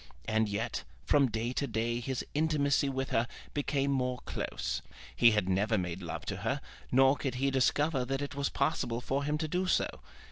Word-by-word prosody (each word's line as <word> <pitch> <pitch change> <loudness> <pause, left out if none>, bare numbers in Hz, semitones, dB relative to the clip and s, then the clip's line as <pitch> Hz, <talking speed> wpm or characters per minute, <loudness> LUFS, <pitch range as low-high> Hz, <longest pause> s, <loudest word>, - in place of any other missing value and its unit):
And 110 -1 +1
yet 100 -9 -2 0.2
from 140 -3 +4
day 115 +2 -2
to 140 - -1
day 115 0 -1
his 125 +1 -3
intimacy 145 -2 +2
with 135 0 -2
her 115 +1 +2 0.3
became 140 -1 0
more 125 -2 0
close. - - -3 0.3
He 120 - +7
had 105 -4 +1
never 105 +4 +2
made 90 -1 -3
love 85 -3 -5
to - - -3
her, - - -1 0.3
nor 135 +2 +6
could 135 -3 -3
he 135 +2 +1
discover 135 +1 +2
that 135 +2 -2
it 145 - -4
was 140 -1 -1
possible 130 -4 0
for 135 +3 -1
him 150 +1 0
to 155 +1 -2
do 180 +3 0
so. - - +3
135 Hz, 190 wpm, -31 LUFS, 115-140 Hz, 0.3 s, He